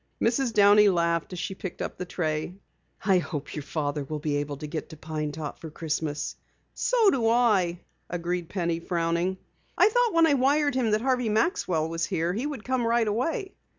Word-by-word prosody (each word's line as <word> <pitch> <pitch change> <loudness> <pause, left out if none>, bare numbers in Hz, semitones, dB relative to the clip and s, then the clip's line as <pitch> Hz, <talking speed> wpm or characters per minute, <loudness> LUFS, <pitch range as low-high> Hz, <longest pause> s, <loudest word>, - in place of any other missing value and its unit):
Mrs. 240 +2 +1
Downey 205 0 +6
laughed 170 -2 0
as 180 - -6
she 190 +3 -3
picked 190 -1 -7
up - - -4
the 180 - -3
tray. 155 0 -2 0.5
"I 190 -3 +5
hope 145 -3 -5
your 150 - -3
father 145 0 -2
will 150 +3 -4
be 150 -1 -1
able 145 0 -3
to 150 - -7
get 155 +1 -5
to 155 - -10
Pine 155 -1 -4
Top 150 -1 -6
for 165 - -8
Christmas." 155 -1 -3 0.4
"So 460 -5 +3
do 240 -4 +1
I," 200 -8 +2 0.3
agreed 175 0 -3
Penny, 170 -3 -1
frowning. 170 +2 -1 0.4
"I 410 - +6
thought 485 0 +2
when 330 0 +6
I 315 - +4
wired 285 +2 +3
him 250 -3 +1
that 215 0 +2
Harvey 250 -2 +1
Maxwell 210 - +1
was 165 0 -2
here 175 -2 -1
he 240 +8 -2
would 280 -8 -6
come 255 -1 0
right 230 -1 +2
away." 330 - -1
180 Hz, 195 wpm, -27 LUFS, 160-240 Hz, 0.5 s, Downey